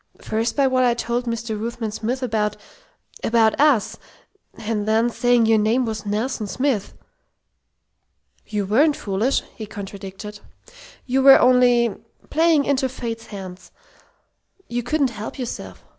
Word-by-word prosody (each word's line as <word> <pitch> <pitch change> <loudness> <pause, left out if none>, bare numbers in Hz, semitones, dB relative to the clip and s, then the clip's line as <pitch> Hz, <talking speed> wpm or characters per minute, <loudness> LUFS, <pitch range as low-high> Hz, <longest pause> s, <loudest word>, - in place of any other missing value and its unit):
First, 225 +2 -2
by 280 - +3
what 260 -1 +2
I 240 -1 +3
told 240 +1 -2
Mr. 230 -1 -3
Ruthven 230 -1 -4
Smith 240 +5 -3
about 210 -3 -1 0.7
about 225 0 +2
us. 285 -8 +3 0.6
And 215 -1 -3
then 225 +2 +2
saying 245 -1 +3
your 220 -1 +4
name 230 +4 +2
was 220 -2 -5
Nelson 215 +1 -2
Smith." 250 -2 -1 1.5
"You 205 -2 -2
weren't 285 +10 +3
foolish!" 210 +7 0
he 215 - -7
contradicted. 200 0 -8 0.7
"You 265 +1 +1
were 270 0 +9
only 245 -2 +4 0.4
playing 320 -3 +3
into 265 -2 +1
Fate's 230 -3 -6
hands. 190 -3 -9 1.0
You 240 0 -2
couldn't 275 +1 0
help 215 -1 -7
yourself. 250 -3 -7
230 Hz, 130 wpm, -22 LUFS, 215-255 Hz, 1.5 s, were